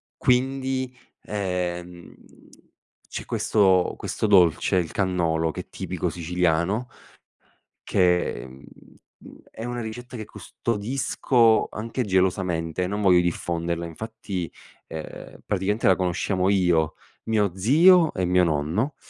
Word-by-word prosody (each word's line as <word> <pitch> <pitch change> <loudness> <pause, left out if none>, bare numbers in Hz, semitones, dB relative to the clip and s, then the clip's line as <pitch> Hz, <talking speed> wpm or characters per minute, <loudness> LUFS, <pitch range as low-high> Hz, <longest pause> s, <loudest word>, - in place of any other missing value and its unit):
quindi, 130 0 0 0.3
ehm, 90 -3 -4 1.0
c'è - - -6
questo 95 -4 +2
questo 110 - -2
dolce, 90 -4 +4
il 85 -3 0
cannolo, 85 -4 0
che - - -5
è - - -17
tipico - - -3
siciliano, 90 +6 0 0.9
che, 90 -9 +1
mhmm, 65 +2 -14 0.6
mhmm, - - -13
è 115 - -8
una 120 0 -4
ricetta 120 +3 -7
che 110 -2 -6
custodisco 115 0 +1
anche 115 +4 -3
gelosamente, 90 -3 0
non 100 +3 -3
voglio 90 -3 +5
diffonderla; 85 -1 -2
infatti, 100 -1 -6 0.4
ehm, 80 -1 -8
praticamente 105 +3 0
la 95 - +6
conosciamo 95 +1 0
io, 90 -5 +2 0.3
mio 105 -5 +1
zio 160 - +5
e 90 - -1
mio 90 0 +3
nonno. 85 - 0
95 Hz, 115 wpm, -24 LUFS, 85-110 Hz, 1.0 s, la